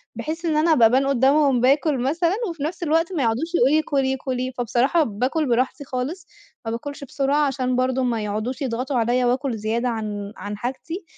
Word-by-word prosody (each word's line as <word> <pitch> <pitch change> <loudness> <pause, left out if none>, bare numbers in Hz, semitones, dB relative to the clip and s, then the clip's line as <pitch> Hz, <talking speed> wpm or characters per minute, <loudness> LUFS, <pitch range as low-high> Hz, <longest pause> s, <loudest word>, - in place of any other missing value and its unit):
بحيث 325 +2 -5
إن 315 -2 +1
أنا 320 +1 +4
أبقى 230 -6 +6
أبان 265 +4 +2
قدامهُم 275 0 +3
باكُل 280 +3 +3
مثلًا 330 +8 +1
وفنفس 330 +2 -4
الوقت 330 +3 +1
مايقعدوش 290 +4 0
يقولوا 270 +2 +4
لي 315 - +4
كُلي، 270 -3 0
كُلي، 255 -1 -3
فبصراحة 250 +7 +2
باكُل 255 +8 -1
براحتي 255 +4 0
خالص، 280 +7 -4 0.4
ما 225 - -2
باكُلش 280 +5 -6
بسرعة 280 +2 +1
عشان 255 -2 -1
برضو 255 +1 +1
ما 230 -3 -1
يقعدوش 215 +6 -3
يضغطوا 255 +1 -2
عليّا 245 +2 +2
وأكُل 250 0 0
زيادة 225 +4 -1
عن 210 -3 -4
عن 205 0 -6
حاجتي، 270 - -5
265 Hz, 175 wpm, -22 LUFS, 240-300 Hz, 0.4 s, أبقى